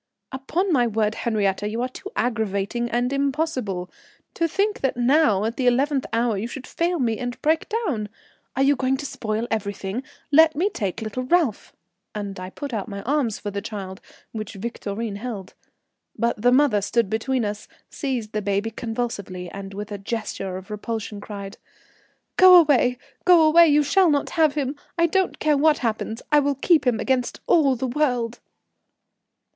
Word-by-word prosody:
"Upon 330 +8 -1
my 245 -4 +3
word, 215 -1 0
Henriette, 210 -3 0
you 225 +2 -3
are - - 0
too 325 +10 -9
aggravating 225 0 -1
and 245 +3 0
impossible. 275 - -1 0.5
To 335 - 0
think 405 +5 -1
that 265 -2 0
now 240 -5 +3
at 230 +1 -3
the 255 - +1
eleventh 270 +2 +2
hour 230 -1 +1
you 220 - -3
should 255 +2 -8
fail 345 +1 -1
me 230 -6 0
and 245 -1 -4
break 315 +6 +1
down. 325 - -2 0.5
Are 270 - +2
you 285 +1 +4
going 265 0 0
to 285 - -6
spoil 225 -4 -3
everything! 200 0 -3 0.3
Let 315 +1 +6
me 375 +7 +1
take 205 +1 -3
little 220 +3 -4
Ralph;" 265 - 0 0.4
and 200 -2 -5
I 185 0 -6
put 280 +6 -7
out 210 -2 -3
my 200 -2 -6
arms 265 -5 0
for 205 - -5
the 200 0 -3
child, 195 -3 -7 0.3
which 215 -2 -6
Victorine 205 0 -4
held. 205 -4 -6 0.6
But 235 -2 0
the 245 +2 +4
mother 255 -6 +4
stood 230 +2 +1
between 225 +3 -1
us, 205 0 -5 0.2
seized 250 -7 -3
the 215 - -2
baby 200 +2 -1
convulsively, 220 -6 -4
and 195 0 -7
with 205 +2 -7
a 205 - -5
gesture 195 -3 -4
of 190 +3 -11
repulsion 210 -1 -5
cried: 200 -1 -8 0.8
"Go 370 0 +9
away, 255 -6 +3 0.3
go 350 -3 +6
away, 330 +2 +7
you 295 0 +4
shall 370 +5 +4
not 290 -2 0
have 310 -3 +3
him. 280 -1 -1 0.2
I 335 - +4
don't 375 +3 0
care 305 -2 +2
what 305 0 +4
happens, 220 0 -2
I 300 - +6
will 285 0 +1
keep 305 +1 +3
him 235 -3 +2
against 250 +1 -1
all 280 -6 +4
the 255 +2 -3
world." 245 -3 0
240 Hz, 175 wpm, -23 LUFS, 210-285 Hz, 0.8 s, Go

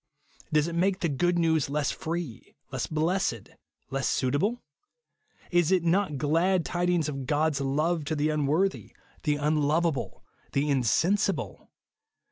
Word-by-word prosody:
Does 155 0 +3
it 170 - -4
make 185 +3 +1
the 170 - +2
good 175 +5 +1
news 160 -4 +2
less 145 0 0
free, 165 -7 -5 0.2
less - - -2
blessed, 160 - -1 0.4
less 135 0 -1
suitable? 160 - 0 0.9
Is 175 -1 +3
it 185 -3 +3
not 170 -3 +1
glad 165 +5 +2
tidings 175 -2 0
of 135 -3 -5
God's 150 -1 +1
love 155 +4 0
to 155 - -1
the 150 +1 +1
unworthy, 155 +6 0 0.3
the 150 -2 +1
imloveable, 150 0 0 0.3
the 145 +1 +1
insensible 175 - 0
155 Hz, 130 wpm, -27 LUFS, 145-175 Hz, 0.9 s, Does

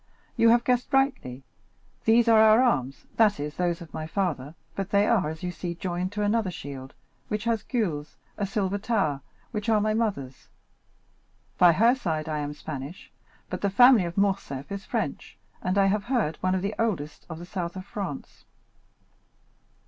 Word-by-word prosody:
"You 230 - +5
have 235 +1 +5
guessed 250 +1 0
rightly. 265 - +1 0.6
These 230 +1 +5
are 225 -1 +6
our 220 +1 +7
arms, 135 - 0
that 215 -2 +4
is, 150 +1 -4
those 175 -1 0
of 170 - -11
my 155 - -4
father, 160 -6 -2 0.2
but 195 -1 -3
they 200 0 +3
are, 210 -9 +2
as 160 +2 -8
you 180 - -2
see, 175 -1 -5
joined 180 +1 -3
to 210 0 -1
another 210 -1 +1
shield, 140 -6 -8 0.3
which 210 0 -2
has 230 -2 0
gules, 170 - -3 0.2
a 200 - -2
silver 195 0 -1
tower, 195 -11 0 0.3
which 210 -1 -3
are 220 -1 +4
my 215 +1 +1
mother's. 195 - -2 1.1
By 175 -2 +7
her 230 +8 +5
side 160 -11 -2
I 155 -1 -2
am 145 0 -4
Spanish, 150 +3 -8 0.4
but - - -5
the 200 - +1
family 245 0 +6
of 170 +2 -6
Morcerf 190 -9 -1
is 200 0 -5
French, 210 - -4 0.2
and, 185 +2 -1
I 195 - +5
have 205 +1 +1
heard, 230 - 0
one 185 0 0
of 185 - -2
the 200 +2 -1
oldest 175 -10 -2
of 160 - -6
the 170 - -8
south 175 -1 -4
of 185 0 -7
France." 195 -9 -7
195 Hz, 180 wpm, -26 LUFS, 160-220 Hz, 1.1 s, our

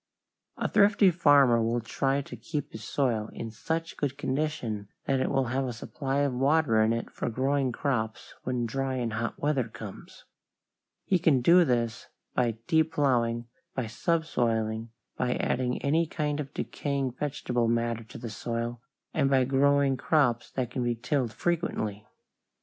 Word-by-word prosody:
A - - 0
thrifty 200 -2 +5
farmer 145 -8 +5
will 115 +2 +1
try 135 +4 0
to - - -9
keep 150 -4 -4
his 110 - -8
soil 115 -3 0
in 115 - -6
such 165 +8 -3
good 140 -1 -2
condition 130 -8 -2 0.2
that 135 -1 +1
it - - +1
will 135 -1 +1
have 135 +1 +1
a 125 - -3
supply 135 +4 -2
of 140 -2 +1
water 135 -3 +3
in 110 +1 +3
it 115 0 -2
for - - -3
growing 130 +2 +1
crops 120 -3 -2
when 125 -2 -1
dry 135 +3 -2
and 120 -3 -2
hot 115 +1 -2
weather 145 -4 +1
comes. 105 -3 -10 0.8
He 185 - +2
can 155 -6 +3
do 175 +7 +7
this 120 -6 -1 0.3
by 115 -3 +1
deep 160 0 +2
plowing, 120 -4 +1 0.3
by 130 - -1
subsoiling, 115 -5 0 0.3
by 125 -1 0
adding 125 -1 0
any 160 +4 +2
kind 150 -1 -2
of 140 -2 -4
decaying 140 -3 -2
vegetable 125 -3 -1
matter 115 0 0
to - - -10
the 115 -3 -6
soil, 115 +2 -3 0.3
and 140 -3 +2
by 135 -1 +4
growing 135 +1 +3
crops 125 -5 +2
that 125 -2 -3
can 125 0 -2
be 120 0 0
tilled 125 0 -1
frequently. 110 - -2
130 Hz, 160 wpm, -28 LUFS, 115-145 Hz, 0.8 s, do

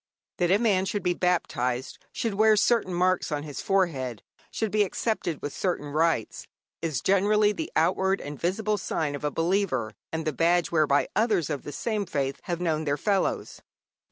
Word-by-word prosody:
That 175 -1 +1
a 195 - +5
man 205 -4 +2
should 205 +1 -2
be 180 - +2
baptized, 130 -9 -1
should 225 -3 -2
wear 215 +1 +4
certain 225 -3 +2
marks 180 -1 +1
on 145 -1 -2
his 145 -4 -6
forehead, 140 - 0 0.3
should 220 -2 -2
be 215 - +2
accepted 195 -5 -1
with 145 - -4
certain 175 -6 -2
rites, 155 -6 0 0.3
is 155 -7 -2
generally 205 +2 +3
the 315 +9 -5
outward 190 +4 +2
and 145 -1 -7
visible 205 +4 0
sign 155 -5 -2
of 145 - -6
a 150 - +1
believer, 165 - 0 0.2
and 160 0 -3
the 155 - 0
badge 170 +3 +2
whereby 150 -3 +3
others 205 -7 +1
of 145 - -2
the 145 - -7
same 210 - -2
faith 140 -5 -2
have 175 -2 -2
known 160 -3 0
their 145 0 0
fellows. 200 +1 -1
175 Hz, 180 wpm, -27 LUFS, 150-200 Hz, 0.3 s, a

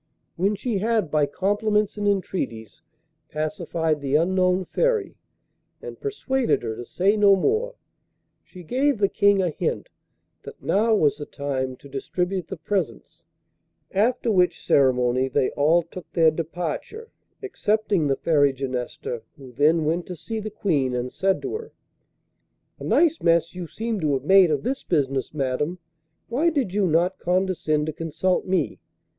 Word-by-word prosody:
When 195 +4 +1
she 210 0 -2
had 215 -5 0
by 150 -2 +2
compliments 205 +5 0
and 205 -1 -2
entreaties 180 - -2 0.5
pacified 160 -1 -2
the 140 0 0
unknown 185 +3 +2
Fairy, 475 - 0 0.6
and - - -9
persuaded 265 - 0
her 110 -1 -3
to 120 +2 -7
say 195 - +1
no 205 -2 +6
more, 445 - 0 0.7
she 180 -2 -13
gave 265 - +1
the 200 -1 +3
King 200 -1 +3
a 175 - 0
hint 470 - -3 0.5
that - - -11
now 220 +2 +2
was 150 -7 +2
the 145 - -7
time 130 -2 -3
to 140 - -15
distribute 180 +6 -3
the 190 - -6
presents, 190 +4 -4 0.7
after 230 +4 +1
which 180 -3 +1
ceremony 130 -1 +3
they 130 0 +1
all 160 +4 +3
took 170 +2 -11
their 160 -2 +5
departure, 170 - -5 0.3
excepting 215 - 0
the 135 - +2
Fairy 145 -2 +2
Genesta, 125 -3 -4 0.2
who 135 -3 -12
then 155 +5 +3
went 170 +3 -1
to 180 - -6
see 220 +8 -5
the 215 0 -5
Queen, 150 -12 0
and 125 +1 -3
said 190 0 0
to 390 - -3
her: 450 +1 -7 1.1
'A - - -7
nice 330 -1 +3
mass 165 0 +2
you 180 -2 -6
seem 225 +4 -3
to 150 -4 0
have 135 -1 -1
made 190 +2 +6
of 145 -3 0
this 265 +1 -2
business, 135 -5 -1
madam. 150 +4 -2 0.5
Why 285 +9 +2
did 275 - -1
you 200 -2 +2
not 175 +3 +1
condescend 180 -4 0
to 155 - -3
consult 165 +5 -1
me? 185 -1 0
180 Hz, 155 wpm, -24 LUFS, 145-205 Hz, 1.1 s, no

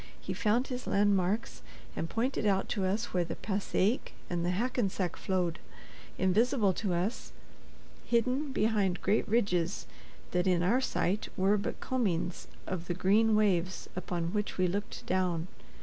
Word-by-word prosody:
He - - -4
found 230 +4 +1
his 250 -1 -5
landmarks, 200 +1 +1 0.3
and 165 - -3
pointed 230 -1 0
out 195 -1 +2
to 195 -3 0
us 210 +5 -1
where 180 -1 +2
the 170 - -5
Passaic 200 +3 0 0.2
and 175 -1 0
the 175 - +1
Hackensack 195 -3 0
flowed, 180 -3 -1 0.6
invisible 210 +2 +3
to 185 -2 -1
us, 190 +7 -2 0.7
hidden 255 +5 +1
behind 210 -6 +1
great 205 +3 +2
ridges 195 -5 +1 0.5
that 180 +1 +1
in 175 -2 +3
our 235 +9 +3
sight 205 -5 0
were 195 +2 +4
but 200 -1 -3
combings 190 -9 -1 0.2
of 175 -2 -4
the 175 - -1
green 215 +4 +4
waves 185 -4 +1
upon 175 -2 -3
which 210 -1 -2
we 185 - +3
looked 200 +4 -4
down. 180 -2 0
195 Hz, 150 wpm, -31 LUFS, 180-220 Hz, 0.7 s, were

